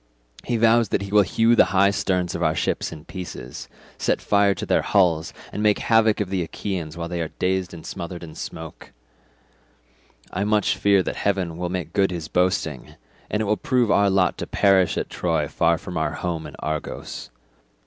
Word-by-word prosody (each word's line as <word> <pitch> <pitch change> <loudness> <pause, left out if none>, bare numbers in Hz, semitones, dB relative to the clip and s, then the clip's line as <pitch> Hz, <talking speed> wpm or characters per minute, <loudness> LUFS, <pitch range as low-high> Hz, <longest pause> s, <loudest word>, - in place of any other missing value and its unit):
He 120 - -1
vows 115 -1 +4
that - - 0
he 100 - -7
will 105 0 +6
hew 115 +5 +3
the - - +6
high 100 +1 +5
sterns 90 -3 -1
of 85 - -4
our 80 -2 +2
ships - - -1
in 80 -1 -10
pieces, 90 -1 -8 0.3
set - - +1
fire 100 -1 +3
to - - -5
their - - +2
hulls, 85 -5 +2 0.2
and 105 - -3
make 105 -1 +3
havoc 110 -2 +3
of 100 -3 -2
the 95 -2 0
Achaeans 85 -1 -4
while 85 0 -3
they 85 0 -3
are 80 - -1
dazed 95 -1 0
and 85 -2 -10
smothered 85 -1 -6
in 80 -2 -9
smoke; 80 -1 -8 1.4
I 95 - 0
much 105 0 +2
fear 100 -2 +3
that - - -4
heaven 95 -5 -1
will 90 +1 -3
make 90 -4 -4
good 100 -1 +3
his 85 -4 -5
boasting, 90 -6 -1 0.3
and 105 +1 0
it - - -2
will 105 +1 +1
prove 125 -4 +1
our 100 0 +4
lot 95 -2 +2
to - - -4
perish 95 -2 +3
at - - -1
Troy - - -1
far 85 0 +2
from 90 0 -7
our 80 - 0
home 85 -3 -3
in - - -11
Argos. 80 0 -5
95 Hz, 200 wpm, -23 LUFS, 85-100 Hz, 1.4 s, will